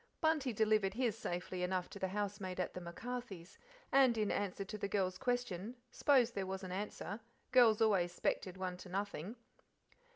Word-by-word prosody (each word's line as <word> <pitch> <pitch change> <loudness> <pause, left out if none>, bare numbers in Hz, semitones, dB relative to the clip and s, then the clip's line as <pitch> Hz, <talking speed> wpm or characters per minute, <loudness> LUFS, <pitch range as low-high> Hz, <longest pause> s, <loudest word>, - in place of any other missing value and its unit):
Bunty 315 -5 +2
delivered 215 -2 +2
his 240 -3 +1
safely 180 +1 -3
enough 180 0 0
to 200 - -8
the 190 - 0
housemaid 195 -1 -3
at 180 - -1
the 180 - -6
MacCarthys', 195 0 -6 0.3
and 265 -4 +5
in 210 -2 +1
answer 195 0 -1
to 205 - -6
the 205 -1 -2
girl's 185 -2 0
question 245 -4 -1 0.2
"s'posed 250 -5 +4
there 195 -1 -2
was 190 0 -4
an 185 - -5
answer, 205 +1 -4 0.3
girls 230 -4 +6
always 190 -5 +3
'spected 185 +1 -1
one 185 -1 -3
to 180 - -10
nothing." 200 +1 -3
200 Hz, 170 wpm, -36 LUFS, 185-225 Hz, 0.3 s, girls